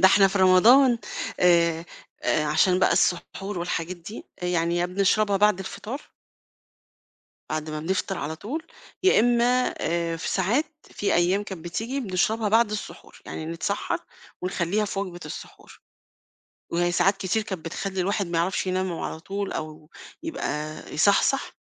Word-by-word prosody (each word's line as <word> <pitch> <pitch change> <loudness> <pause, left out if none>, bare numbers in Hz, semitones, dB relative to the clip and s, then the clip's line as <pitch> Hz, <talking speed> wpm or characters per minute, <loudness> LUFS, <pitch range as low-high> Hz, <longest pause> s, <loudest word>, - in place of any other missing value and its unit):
ده 190 - +8
إحنا 195 0 +6
في 195 - -1
رمضان 230 +7 +6 0.4
آآ 170 -2 +4 0.4
عشان 155 +5 +3
بقى - - +4
السّحور 195 +2 0
والحاجات 175 0 -3
دي، 175 +6 -9 0.2
يعني 170 -1 +1
يا 175 0 +1
بنشربها 200 +2 +2
بعد 210 -1 +4
الفطار 220 +8 -6 1.5
بعد 155 0 -3
ما 155 0 -4
بنفطر 190 +3 -1
على 160 +2 -4
طول 285 - -5 0.4
يا 380 - +5
إمّا 245 +2 +3
آآ، 170 0 -1
في - - -3
ساعات 215 - +1 0.3
في 205 - -1
أيام 180 +4 +2
كان 190 -5 -7
بتيجي، 225 +11 -3
بنشربها 215 +1 0
بعد 225 0 +4
السحور، 210 - -7
يعني 155 - -6
نتسحّر 170 +5 -2 0.4
ونخلّيها 185 +3 0
في 195 -1 -3
وجبة 180 -3 -5
السحور، - - -10 0.9
وهي 175 +1 +1
ساعات 190 +3 +3
كتير 190 +4 0
كان 190 -6 -5
بتخلّي 190 +3 -3
الواحد 200 +1 0
ما 170 -1 -2
يعرفش 185 +2 0
ينام 185 0 0
على 160 - -4
طول 200 +3 -4
أو 155 -1 -6 0.3
يبقى 155 - -3 0.2
يصحصح، 200 - +3
185 Hz, 145 wpm, -25 LUFS, 170-210 Hz, 1.5 s, ده